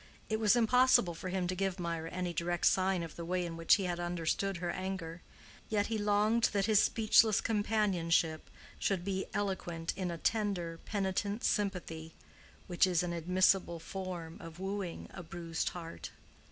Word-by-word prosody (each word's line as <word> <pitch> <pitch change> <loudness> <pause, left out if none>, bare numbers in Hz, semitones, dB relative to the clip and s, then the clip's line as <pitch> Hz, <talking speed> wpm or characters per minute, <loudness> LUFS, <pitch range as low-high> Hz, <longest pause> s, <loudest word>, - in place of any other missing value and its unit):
It 220 0 0
was 215 0 +4
impossible 240 -5 +4
for 185 +3 -6
him 185 0 -1
to 180 - -1
give 190 0 -2
Mirah 165 -2 -3
any 180 0 -3
direct 170 +1 -1
sign 185 -2 +3
of 165 - -8
the 170 - -6
way 180 +1 -1
in 170 -1 -5
which 165 0 +5
he 200 - -2
had 175 -1 -2
understood 175 +2 -1
her 175 0 -2
anger, 185 -3 -5 0.5
yet 205 -2 +1
he 220 - 0
longed 210 +3 +3
that 200 -1 +2
his 215 -2 +5
speechless 220 -1 +4
companionship 190 -7 +1 0.3
should 185 -3 0
be 190 -1 -2
eloquent 175 -5 -2
in 185 -1 -2
a 170 - -4
tender, 180 -5 -1
penitent 200 +1 -1
sympathy 170 -6 -2 0.5
which 180 0 +3
is 180 -2 +1
an 175 -1 -2
admissible 180 0 +2
form 175 -1 -6
of 165 0 -10
wooing 190 -2 -4
a 175 - -7
bruised 165 -1 -3
heart. 165 -2 -8
185 Hz, 165 wpm, -33 LUFS, 170-200 Hz, 0.5 s, which